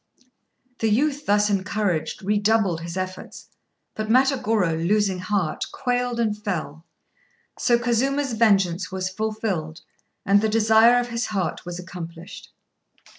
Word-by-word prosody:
The 225 - +1
youth, 290 +6 0
thus 205 0 +3
encouraged, 195 -2 -1
redoubled 205 -3 +1
his 170 +2 -6
efforts; 185 0 -6 0.4
but 215 0 -4
Matagorô, 225 - +2
losing 200 -2 +1
heart, 185 -4 -1
quailed 245 -1 -1
and 220 -3 +1
fell. 175 -7 -5 0.7
So 240 - +3
Kazuma's 255 +3 0
vengeance 195 -6 +2
was 185 0 -2
fulfilled, 195 -6 -3 0.4
and 200 +1 +4
the 220 - +1
desire 225 +2 +5
of 245 0 -3
his 235 0 -2
heart 185 -5 -3
was 175 -1 -5
accomplished. 175 0 -9
210 Hz, 125 wpm, -23 LUFS, 185-230 Hz, 0.7 s, desire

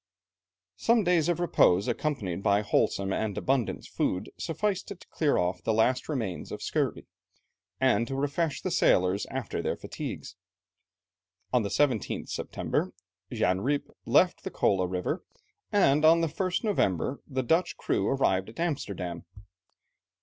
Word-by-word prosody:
Some 230 -1 +3
days 175 -3 +2
of 175 - +1
repose 100 - +3
accompanied 115 - -2
by 100 +1 +3
wholesome 100 -1 +1
and 105 -2 -2
abundant 120 +4 0
food 90 - -2
sufficed 190 +4 -2
to - - -6
clear 155 -4 -1
off 90 +1 0
the 110 - 0
last 125 +6 +2
remains 115 - -3
of - - -6
scurvy, - - -1 0.7
and 130 -3 +3
to 135 - -4
refresh 145 +2 -1
the - - -2
sailors 90 +2 +3
after 130 -4 -4
their - - -1
fatigues. - - -7 1.2
On 125 - +4
the 100 - -2
17th 130 -3 0
September, - - -2 0.4
Jan 95 +1 +1
Rijp 140 +7 -1 0.2
left - - +3
the - - -3
Kola 95 -2 +1
River, 90 0 -2 0.5
and 150 -7 +4
on 165 +1 +6
the 165 - +2
1st 185 +6 -2
November 135 - 0
the 130 -2 -2
Dutch 165 +7 +1
crew - - 0
arrived 95 -8 +1
at 115 - -13
Amsterdam. 95 - -3
130 Hz, 140 wpm, -28 LUFS, 100-160 Hz, 1.2 s, on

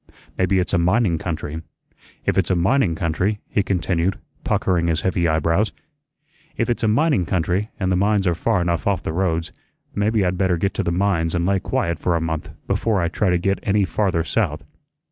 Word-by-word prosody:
Maybe 95 +1 +1
it's 90 +1 0
a 90 - +3
mining 90 -1 +2
country. 80 -2 -4 0.6
If - - +1
it's 95 -3 +1
a 95 - +3
mining 90 +1 +2
country," 85 +6 -1
he 100 - +1
continued, 90 -1 0 0.3
puckering 85 -2 +1
his 80 -2 0
heavy 90 -1 +1
eyebrows, 80 +6 +1 0.8
"if 120 0 +1
it's 120 - -2
a 110 - +2
mining 135 - +2
country, 90 +4 -1
an' 95 -2 0
the 95 - +2
mines 100 +1 +2
are 90 - +3
far 95 +3 0
enough 85 0 -1
off 95 -5 +1
the 80 - -3
roads, 85 -2 -1 0.4
maybe 105 0 +1
I'd 90 0 -1
better 95 -3 +2
get 95 +3 -1
to - - -1
the 85 - -1
mines 85 -2 +1
an' 85 0 0
lay 100 +1 +2
quiet 85 -2 -1
for 85 - +1
a - - +1
month 80 -1 -3 0.2
before 110 -4 0
I 85 -1 0
try 95 +3 0
to 90 - +3
get 95 +3 0
any 100 0 +2
farther 90 -3 0
south." 80 - -1
90 Hz, 200 wpm, -21 LUFS, 85-100 Hz, 0.8 s, a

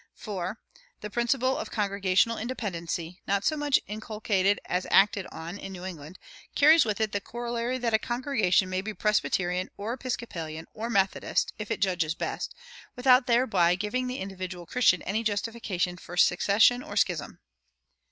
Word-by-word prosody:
4. 205 0 -5 0.4
The 210 - -6
principle 255 +3 +1
of - - -5
congregational 200 +1 +1
independency, 180 -7 -4
not 200 0 +1
so 310 - +2
much 290 -2 +2
inculcated 210 -2 0
as 180 +1 -2
acted 200 -1 +4
on 165 +5 -7
in 195 - -7
New 180 0 -8
England, 170 -1 -8 0.4
carries 310 0 +6
with 215 -2 -2
it 220 -2 0
the 200 - -2
corollary 240 +2 -3
that 240 -3 -1
a 220 - +5
congregation 240 -7 +1
may 185 0 -2
be 215 +1 -6
Presbyterian 180 -1 0
or 210 +3 -3
Episcopalian 175 -11 -5
or 225 +2 -4
Methodist, 195 -4 +1
if 215 - -5
it - - -2
judges 175 -5 +1
best, - - -4 0.4
without 250 0 +5
thereby 210 -8 +3
giving 230 +7 -2
the 250 +1 -3
individual 185 -2 -6
Christian 205 -2 +3
any 210 +4 -1
justification 205 -4 -2
for 175 -1 -10
secession 200 +7 +4
or 205 - -8
schism. 175 -6 0
205 Hz, 155 wpm, -28 LUFS, 185-235 Hz, 0.4 s, carries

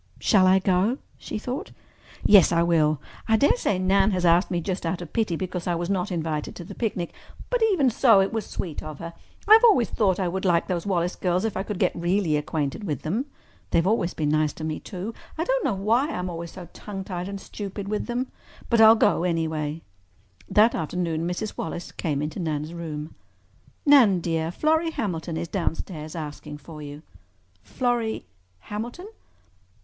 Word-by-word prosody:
"Shall 190 -3 +4
I 190 +1 +6
go?" 190 +6 +2 0.2
she - - -5
thought. 255 - -4 0.6
"Yes, 200 -3 +7
I 170 0 +3
will. 155 -3 +2 0.3
I 220 - +4
dare 285 - +4
say 205 -5 0
Nan 190 +2 +3
has 180 -3 0
asked 170 +2 +4
me 175 - 0
just 185 +2 -3
out 170 +2 -1
of 175 -3 -9
pity 215 -7 0
because 180 0 -4
I 175 - +1
was 175 +3 -2
not 185 -1 -1
invited 160 -3 -3
to 175 - -7
the 170 - -9
picnic. 195 -7 -3 0.4
But - - +1
even 280 -10 +3
so 225 -3 +5
it 195 +3 +1
was 220 -2 -2
sweet 165 -5 -5
of 155 -2 -7
her. 165 +2 -7 0.3
I've 440 +3 +8
always 385 - +5
thought 195 -4 +1
I 185 - 0
would 190 +2 -3
like 175 -3 +3
those 175 0 -3
Wallace 175 -2 0
girls 180 +2 0
if 220 - -2
I 190 - -1
could 210 0 -4
get 180 - +1
really 175 -1 +1
acquainted 150 +3 -2
with 150 -9 -3
them. 220 - -1 0.4
They've 165 0 +2
always 190 -4 +1
been 150 -2 0
nice 155 -1 +2
to 155 - -9
me, 155 -1 -2
too—I 215 - -6
don't - - 0
know - - +1
why 230 +9 +2
I - - -4
am 180 0 -3
always 170 0 -6
so 180 -2 -9
tongue 195 -2 -7
tied 180 -1 -5
and 200 0 -5
stupid 200 0 -6
with 210 +1 -2
them. 250 +1 -2 0.4
But 230 -1 +5
I'll 220 0 +9
go 220 - +2
anyway." 160 -2 -1 0.7
That 220 +3 +5
afternoon 165 0 -2
Mrs. 195 +4 -4
Wallace 170 +2 -5
came 150 -3 -2
into 155 +5 -4
Nan's 155 -1 -3
room. 160 -2 -6 0.7
"Nan, 250 -11 +6
dear, 165 -1 -1
Florrie 320 - +1
Hamilton 175 - -3
is 170 - -3
downstairs 165 -3 -3
asking 150 -1 -6
for 155 0 -11
you." 145 +1 -9 0.6
"Florrie—Hamilton?" 220 - -4
180 Hz, 190 wpm, -25 LUFS, 165-215 Hz, 0.7 s, I'll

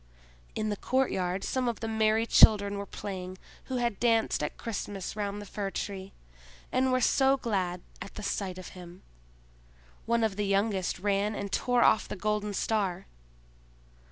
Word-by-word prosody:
In 215 0 -1
the 205 - -1
courtyard 190 -8 0
some 255 -2 0
of 235 - -4
the 225 - -3
merry 220 0 +2
children 205 -3 +6
were 200 - -5
playing 185 -2 -6 0.3
who 260 - -4
had 240 -4 -1
danced 230 -7 +2
at 150 - -3
Christmas 205 -4 -5
round 205 -1 -3
the 205 - -7
Fir 200 0 -4
tree, 195 -1 -5 0.6
and 260 +1 +2
were 255 - +3
so 270 +2 +4
glad 185 -7 -1 0.2
at - - -8
the 210 - -7
sight 190 -2 -2
of 185 - -8
him. 180 0 -12 1.0
One 235 0 +2
of 210 -3 0
the 205 -1 0
youngest 195 -1 +1
ran 200 +2 0
and 200 -1 -4
tore 245 -1 +2
off 220 - +4
the - - -5
golden 210 +1 -1
star. 195 -5 -1
205 Hz, 165 wpm, -29 LUFS, 195-225 Hz, 1.0 s, children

